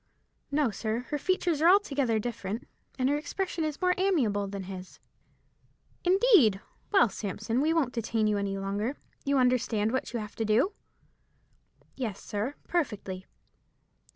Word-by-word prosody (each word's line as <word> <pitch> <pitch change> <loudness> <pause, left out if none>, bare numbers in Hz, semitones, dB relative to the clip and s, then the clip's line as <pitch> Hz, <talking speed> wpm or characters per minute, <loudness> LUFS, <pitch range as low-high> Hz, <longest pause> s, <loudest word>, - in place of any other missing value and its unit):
"No, 280 -4 +2
sir. 220 +3 -2
Her 295 - -1
features 350 -2 0
are 335 - +7
altogether 280 - +3
different, 220 -1 -4 0.3
and 255 -1 +2
her 290 +2 +2
expression 340 +2 -3
is 305 -1 -2
more 365 0 +4
amiable 245 - +2
than 195 0 -5
his." 185 -1 -9 1.0
"Indeed! 365 - +5 0.3
Well, 390 - +6
Sampson, 210 +4 -2
we 310 +2 +2
won't 300 -7 +1
detain 225 -1 0
you 210 -1 +2
any 200 -1 -2
longer. 205 +7 -2 0.3
You 280 0 +2
understand 245 -4 +2
what 260 - -2
you 240 - -2
have 210 -1 -7
to 225 - 0
do?" 230 - +2 1.2
"Yes, 225 -7 -3
sir, 215 +8 -3
perfectly." 200 - -2
245 Hz, 145 wpm, -29 LUFS, 210-305 Hz, 1.2 s, are